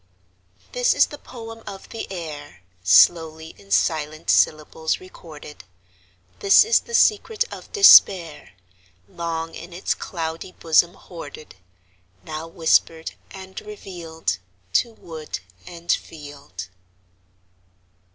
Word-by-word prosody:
This - - +2
is - - +5
the 295 - -11
poem 225 -4 -10
of 195 - -9
the 225 - -7
air, 150 - -8 0.2
Slowly 160 - +4
in 100 -1 -19
silent 155 - 0
syllables 155 +1 +1
recorded; 150 - -12 0.8
This 200 - +6
is 450 - +4
the 470 - -5
secret 435 +1 +3
of - - -11
despair, 180 - +6 0.5
Long 165 -1 -4
in 170 +2 -10
its 180 - -1
cloudy 165 +1 -6
bosom 170 +2 +2
hoarded, 155 -3 -11 0.7
Now 155 - -6
whispered 165 -1 +1 0.2
and 190 0 -9
revealed 170 - -5 0.3
To 235 - +2
wood 160 - -7 0.3
and 170 0 -4
field. 145 - -6
165 Hz, 105 wpm, -22 LUFS, 155-190 Hz, 0.8 s, This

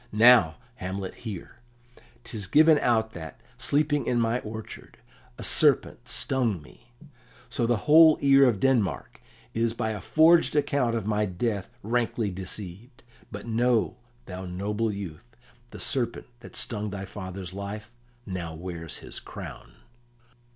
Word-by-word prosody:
"Now, 110 -7 +6 0.2
Hamlet, 95 -1 -5
hear. 105 -7 -8 0.7
'Tis 105 -4 -5
given 155 +6 +6
out 110 -2 +1
that, 80 -5 -9 0.2
sleeping 145 0 +1
in 120 - +2
my 115 +1 +1
orchard, 110 -1 -9 0.4
a - - -7
serpent - - +2
stung 120 -8 0
me; 75 +9 -18 0.6
so 120 -1 0
the 120 -1 +2
whole 155 +1 +8
ear 140 0 +6
of 115 -6 +2
Denmark 110 - 0 0.3
is 115 0 0
by 110 -1 -1
a 105 - -5
forged 165 +1 +4
account 140 -5 +1
of 110 -4 -2
my 105 0 +1
death 100 +1 -2
rankly 115 -1 0
deceived. 95 +6 -8 0.3
But - - -7
know, 120 0 +1 0.3
thou 95 0 -7
noble 105 +5 -2
youth, 100 +2 -8 0.3
the - - -10
serpent 130 -6 0
that 120 - -13
stung 105 -2 -1
thy 100 -1 -5
father's 95 -2 -7
life 100 +2 -6 0.3
now 90 -4 -5
wears 85 -1 -6
his - - -6
crown." - - -10
110 Hz, 135 wpm, -27 LUFS, 95-120 Hz, 0.7 s, whole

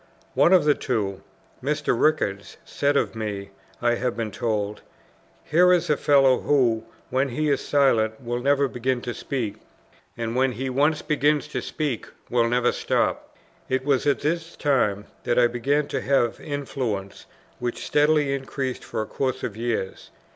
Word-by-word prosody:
One 170 - +4
of 185 -5 +6
the 150 - +5
two, 105 -9 -2 0.4
Mr. 150 -1 0
Rickards, 115 -8 0
said 145 0 +1
of - - 0
me, 105 -3 -5 0.3
I 120 0 +4
have 120 0 -2
been 110 -2 -2
told, 105 -1 -2 0.6
"Here 180 +4 +4
is 175 -4 +2
a - - +4
fellow 135 -3 +4
who, 120 -6 +2 0.3
when 135 +2 +1
he 150 +4 0
is 140 - +1
silent, 115 -6 +2
will 120 -1 -3
never 140 +2 +2
begin 125 0 -1
to 120 - -4
speak; 115 -3 -3 0.6
and 115 0 -3
when 130 0 +2
he 130 +3 -3
once 150 +4 +2
begins 150 0 +1
to - - -3
speak, 145 -7 -3 0.2
will 120 -1 +3
never 125 0 +2
stop." - - -1 0.3
It 130 0 0
was 140 -1 +2
at 145 - +2
this 165 +3 -2
time 105 -9 +1 0.2
that 120 - 0
I 125 - +6
began 135 +5 +1
to - - -2
have 130 -4 +1
influence, 130 -9 -4 0.3
which 120 0 -3
steadily 150 -1 +3
increased 135 -1 -4
for 110 - -3
a - - -6
course 130 +2 -2
of 105 - -3
years. 115 -4 -3
130 Hz, 165 wpm, -24 LUFS, 115-145 Hz, 0.6 s, of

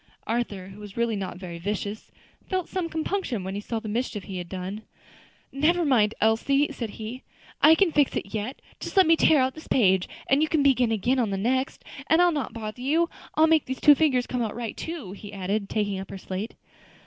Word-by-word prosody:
Arthur, 215 -5 -2
who 195 +2 -12
was 205 0 -10
really 235 -1 +1
not 190 -3 -4
very 175 -2 -7
vicious, 205 +3 -4 0.4
felt 370 -2 -1
some 365 -3 -3
compunction 320 - -2
when 190 +1 -4
he 205 - -3
saw 225 +2 -3
the 220 - -8
mischief 215 -2 -2
he 190 -2 -6
had 175 -1 -7
done. 190 +3 -5 0.7
"Never 330 +5 +2
mind, 225 -7 +3
Elsie," 275 +6 +2
said 240 -6 -4
he. 230 +4 -6 0.4
"I 315 +1 +8
can 355 0 +3
fix 290 -3 +2
it 200 - -4
yet. 220 +5 -4 0.2
Just - - -7
let 380 - +8
me 330 +1 +6
tear 315 -2 +5
out 260 0 +2
this 315 - -12
page, 190 -6 +3 0.2
and 275 +2 +3
you 310 - +2
can 310 -4 +2
begin 255 -4 +3
again 245 +5 +1
on 230 -4 +1
the 195 - -2
next, 260 +6 -1 0.2
and 320 - +4
I'll 355 0 +5
not 295 -4 -2
bother 220 +1 -6
you. 320 +6 +1 0.2
I'll 315 - +6
make 320 -2 +3
these 260 0 -4
two 295 - +8
figures 265 -4 +2
come 250 - -2
right 230 0 -3
too," 320 - -6
he 205 +1 -9
added, 200 +1 -2
taking 205 -3 -1
up 190 - -7
her 195 - -6
slate. 190 +3 -5
235 Hz, 220 wpm, -26 LUFS, 205-295 Hz, 0.7 s, I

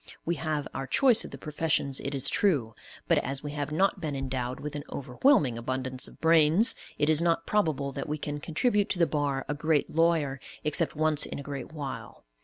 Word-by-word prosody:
We 170 - 0
have 155 -2 -2
our 135 0 -4
choice 255 - +5
of - - -8
the - - -9
professions, 150 -3 0
it 140 +1 -4
is 135 +1 +1
true, 140 - +1 0.3
but, - - +4
as 135 +2 -4
we 145 - -5
have 145 0 -4
not 190 +4 +1
been 150 -4 -3
endowed 130 -2 -3
with 150 0 -6
an 145 - -4
overwhelming 135 - +2
abundance 130 +1 -1
of - - -15
brains, 165 +6 +5 0.2
it 145 - +1
is 155 0 +4
not 165 -1 +1
probable 155 -9 0
that 140 +2 -6
we 150 - -1
can 145 0 -5
contribute 205 - 0
to - - 0
the 170 - +4
bar 145 -4 -1
a 145 - -1
great 150 0 0
lawyer 160 -4 +1 0.2
except 150 -1 0
once 155 -1 +1
in - - -6
a 140 - -7
great 140 -1 -6
while. 145 - -7
150 Hz, 210 wpm, -28 LUFS, 135-160 Hz, 0.3 s, choice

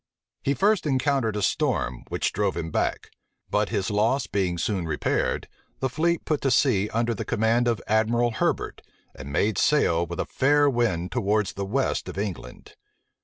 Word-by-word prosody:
He 140 - 0
first 200 - +2
encountered 135 -5 +1
a 105 - -2
storm, 65 -7 0
which - - -1
drove 100 -3 0
him 80 -1 -4
back: - - -1 0.4
but 105 0 +1
his 105 -3 -1
loss 115 +6 +2
being 90 -3 -1
soon 90 0 -1
repaired, 75 -2 -1 0.3
the 130 - 0
fleet 170 +5 0
put 150 -2 0
to 135 - +1
sea 110 -5 +3
under 115 +1 0
the 105 - -4
command 115 +3 +1
of 115 -2 +1
Admiral 115 +2 +2
Herbert, 110 - -1 0.3
and 65 +2 -9
made 100 +6 +1
sail 85 - +2
with 85 +2 -6
a - - 0
fair 145 +2 +3
wind 115 -10 0
towards 105 -4 0
the 100 - -4
west 130 +7 -1
of - - -8
England. 100 -4 -6
110 Hz, 170 wpm, -25 LUFS, 95-130 Hz, 0.4 s, sea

